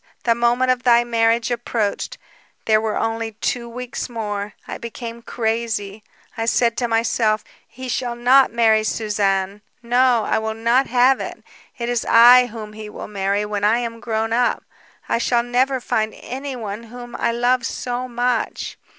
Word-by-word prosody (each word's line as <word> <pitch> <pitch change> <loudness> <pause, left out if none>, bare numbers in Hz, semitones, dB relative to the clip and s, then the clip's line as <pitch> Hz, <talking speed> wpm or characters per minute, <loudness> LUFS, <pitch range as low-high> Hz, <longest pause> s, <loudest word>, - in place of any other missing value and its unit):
The 235 - +3
moment 240 +2 +2
of 250 -1 0
thy 240 -1 +5
marriage 230 0 +1
approached. 235 -3 -2 0.5
There 215 -1 +3
were 220 -1 -1
only 225 0 -2
two 235 +2 -3
weeks 250 +1 -5
more. 210 -3 -4
I - - -6
became 235 0 -7
crazy. 220 -3 -3 0.3
I 225 -2 -2
said 235 0 +2
to 245 - 0
myself: 225 -1 +1 0.2
'He 260 +2 -9
shall 245 -1 -2
not 255 +2 +5
marry 220 -2 +3
Suzanne, 205 -2 -1 0.2
no, 245 -1 +3
I - - +1
will 220 0 -3
not 235 +4 +2
have 255 +2 +4
it! - - -7 0.3
It 235 - -3
is 240 -1 0
I 245 +2 +8
whom 215 -2 -8
he 215 0 -8
will - - -8
marry 200 0 -1
when 205 -1 -3
I 215 +3 +4
am 230 -1 -4
grown 225 -1 -2
up. 245 +1 +1 0.4
I - - 0
shall 240 0 +1
never 255 +2 +1
find 220 -2 -1
anyone 245 -5 -6
whom 240 +1 -10
I 235 - +1
love 245 +1 +1
so 245 +2 -3
much.' 245 -1 -2
235 Hz, 165 wpm, -21 LUFS, 220-245 Hz, 0.5 s, I